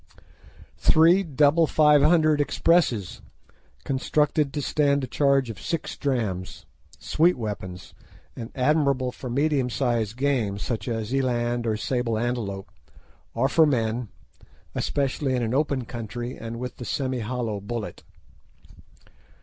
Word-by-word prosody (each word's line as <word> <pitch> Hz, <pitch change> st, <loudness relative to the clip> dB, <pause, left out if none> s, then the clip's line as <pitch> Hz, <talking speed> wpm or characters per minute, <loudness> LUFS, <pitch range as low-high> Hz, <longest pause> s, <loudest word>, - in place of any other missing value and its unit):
"Three 165 Hz, +4 st, +5 dB
double 155 Hz, -1 st, +3 dB
500 155 Hz, +1 st, +4 dB
Expresses, 145 Hz, -, +1 dB, 0.6 s
constructed 150 Hz, +2 st, 0 dB
to 145 Hz, -, -3 dB
stand 140 Hz, -1 st, +1 dB
a -, -, -3 dB
charge 135 Hz, -1 st, +2 dB
of 105 Hz, -, -11 dB
six 165 Hz, -2 st, -3 dB
drachms," 110 Hz, -10 st, -3 dB, 0.3 s
sweet 160 Hz, -, +2 dB
weapons, 95 Hz, -5 st, -6 dB, 0.4 s
and 115 Hz, -1 st, -7 dB
admirable 135 Hz, -2 st, +1 dB
for 125 Hz, 0 st, -8 dB
medium 140 Hz, 0 st, +1 dB
sized 120 Hz, -4 st, -1 dB
game, 130 Hz, -8 st, 0 dB
such 105 Hz, 0 st, -4 dB
as 115 Hz, 0 st, -3 dB
eland 120 Hz, -3 st, 0 dB
or 110 Hz, -1 st, 0 dB
sable 120 Hz, -1 st, -1 dB
antelope, 110 Hz, -5 st, -3 dB, 0.6 s
or 120 Hz, +4 st, +2 dB
for 160 Hz, +2 st, +4 dB
men, 115 Hz, -3 st, 0 dB, 0.7 s
especially 135 Hz, -1 st, -1 dB
in 125 Hz, -, 0 dB
an 115 Hz, +1 st, -1 dB
open 140 Hz, -3 st, 0 dB
country 120 Hz, +1 st, -6 dB
and 115 Hz, 0 st, -7 dB
with 125 Hz, +1 st, -6 dB
the 125 Hz, -, -7 dB
semi 130 Hz, -1 st, -2 dB
hollow 115 Hz, -2 st, -3 dB
bullet. 105 Hz, +2 st, -6 dB
125 Hz, 125 wpm, -25 LUFS, 115-145 Hz, 0.7 s, Three